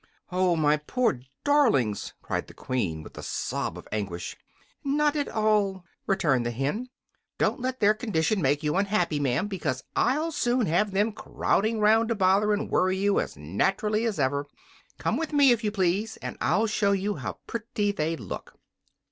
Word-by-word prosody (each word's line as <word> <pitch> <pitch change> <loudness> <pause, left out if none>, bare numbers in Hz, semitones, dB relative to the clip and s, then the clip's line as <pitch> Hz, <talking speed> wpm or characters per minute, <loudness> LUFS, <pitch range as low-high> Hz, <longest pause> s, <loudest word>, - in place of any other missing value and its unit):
"Oh, 180 -1 +2
my 150 -1 +3
poor 220 - 0 0.2
darlings!" 225 - +2
cried - - -3
the - - -14
Queen, 90 -12 -2
with - - -12
a - - -5
sob - - -3
of - - -11
anguish. 90 -4 -4 0.5
"Not 295 +1 +2
at 290 -1 -1
all," 205 -4 +1 0.2
returned 150 -10 +2
the 120 - -1
hen. 140 - -2 0.5
"Don't - - +1
let 255 +1 -3
their 210 0 +5
condition 215 -3 0
make 145 +1 +1
you 150 +1 0
unhappy, 195 -6 +1
ma'am, 135 +4 +1
because 165 -10 -3
I'll 305 +7 +1
soon 245 -5 +1
have 180 +6 +2
them 205 +3 +1
crowding 220 +1 0
'round 220 +2 +4
to 230 - +1
bother 195 +2 +3
and 205 0 0
worry 185 +1 +2
you 200 +1 +2
as - - -4
naturally 195 - 0
as 215 -8 -1
ever. 140 +1 0 0.5
Come - - 0
with 325 -1 -3
me, 285 -3 +6
if 235 -1 +1
you 210 - +1
please, 205 +2 0
and - - -6
I'll 220 - +2
show 210 -2 +2
you 200 +1 -1
how - - -5
pretty 215 -2 -2
they 165 -4 -1
look." 110 - -8
200 Hz, 175 wpm, -27 LUFS, 150-225 Hz, 0.5 s, me